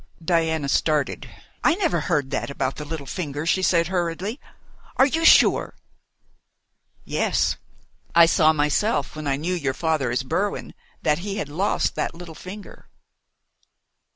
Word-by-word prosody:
Diana 160 -4 +1
started. 150 0 0 0.3
"I - - +4
never 365 -4 0
heard 145 -6 -1
that 135 - -2
about 135 -1 -2
the 150 - -6
little 150 -2 -6
finger," 150 -2 -4
she 185 +3 +2
said 170 -2 +3
hurriedly. 185 - -2 0.6
"Are 265 - +6
you 320 +4 -1
sure?" - - +5 1.3
"Yes. - - 0 0.6
I 170 0 +9
saw 160 -1 +4
myself 150 +2 0
when 155 -1 -5
I 135 - +1
knew 165 +6 -2
your 140 -7 -2
father 160 -6 0
as 125 +2 -1
Berwin, 195 +10 -2 0.3
that 150 0 +2
he 195 +2 -4
had 150 - -3
lost 180 +8 0
that - - -3
little 170 -1 -9
finger." 195 +6 -11
160 Hz, 145 wpm, -23 LUFS, 145-185 Hz, 1.3 s, I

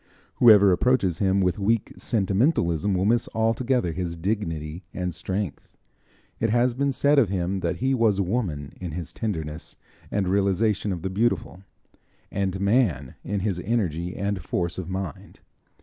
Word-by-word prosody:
Whoever 105 -5 +7
approaches 95 -3 +2
him 95 -1 +2
with 90 0 +1
weak 110 +2 0
sentimentalism 100 - +1
will 90 +1 +1
miss 115 +2 +2
altogether 115 -2 +1
his 85 0 -4
dignity 80 -3 -3
and 90 -1 -2
strength. 95 +1 -4 0.7
It 115 - +1
has 120 +2 +2
been 140 +3 0
said 140 +2 +3
of 115 -8 +3
him 95 0 -1
that 85 -2 -1
he 130 +2 0
was 115 -5 +2
Woman 90 - -2
in 90 -4 -5
his 85 -1 -5
tenderness 80 -8 -4 0.3
and 100 -2 0
realization 100 +2 +1
of 90 -3 -4
the 95 - -2
beautiful; 105 -2 -1 0.7
and 95 -1 -1
Man 100 - +1
in 100 0 -2
his 95 -3 -1
energy 90 -5 -1
and 100 -1 -2
force 85 +3 -2
of 90 -1 -6
mind. 95 -2 -6
95 Hz, 150 wpm, -25 LUFS, 90-110 Hz, 0.7 s, Whoever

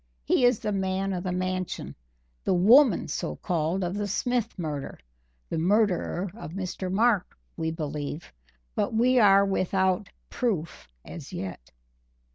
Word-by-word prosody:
He 245 - +3
is 245 -2 +4
the 210 - -3
man 190 0 -1
of 180 -1 -3
the 185 - -2
Mansion 185 0 -3 0.5
the - - +2
woman, 225 +5 +6
so 150 - -3
called, 175 +1 -1
of 175 0 -2
the 205 0 -2
Smith 235 +2 -1
murder 150 -5 -4 0.5
the - - -2
murderer 190 0 +1
of 200 -7 -9
Mr. 185 -1 -4
Mark 215 -1 +2 0.2
we 160 - -2
believe, 150 -1 -5 0.4
but 220 - -1
we 250 +3 +4
are 200 -2 +6
without 190 -1 0 0.2
proof 175 - -2 0.2
as 160 -6 -9
yet." 90 -11 -6
185 Hz, 140 wpm, -27 LUFS, 170-210 Hz, 0.5 s, woman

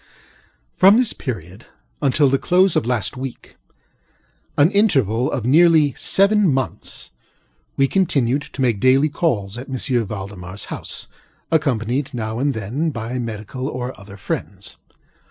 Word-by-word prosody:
From 195 +4 +6
this 250 -3 +2
period 100 - -7 0.3
until 145 +1 +3
the 135 0 +2
close 185 0 +3
of 115 - +1
last 120 -6 -1
weekŌĆöan 135 +4 -5
interval 135 - +2
of 125 -5 -3
nearly 155 0 +5
seven 200 +1 +3
monthsŌĆöwe 130 - -4
continued 140 -8 +1
to 140 - -8
make 115 -5 +1
daily 135 +6 +4
calls 115 - -1
at 130 - -9
M. 130 - -3
ValdemarŌĆÖs 100 -7 -4
house, - - -6 0.5
accompanied, 135 -4 0
now 110 -1 -3
and 140 +1 0
then, 120 +10 -2
by 120 -2 -4
medical 120 +4 -5
and 125 - -3
other 100 0 -13
friends. 95 - -5
130 Hz, 125 wpm, -20 LUFS, 110-150 Hz, 0.5 s, From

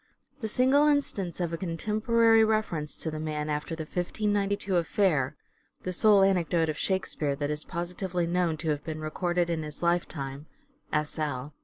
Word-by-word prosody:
The 220 - -3
single 265 +6 +4
instance 210 - 0
of 170 -2 -1
a 165 - -3
contemporary 220 +6 +3
reference 215 -9 0
to 160 - -4
the 155 - -5
man, 155 -1 -2
after 150 +2 -3
the 160 - -4
1592 200 +3 -1
affair 165 - +1 0.2
(" - - -39
The 185 - -2
sole 205 +1 +6
anecdote 175 -4 +2
of 155 - -2
Shakespeare 160 -7 0
that 145 +1 -2
is 150 0 -3
positively 175 0 -3
known 170 -2 0
to - - +1
have 150 -1 -1
been 155 -1 -5
recorded 175 +2 -1
in 165 -1 -1
his 150 +1 -7
lifetime," 150 -5 -1 0.4
S. 150 +1 -1
L.) 145 -1 -3
170 Hz, 170 wpm, -28 LUFS, 155-195 Hz, 0.4 s, sole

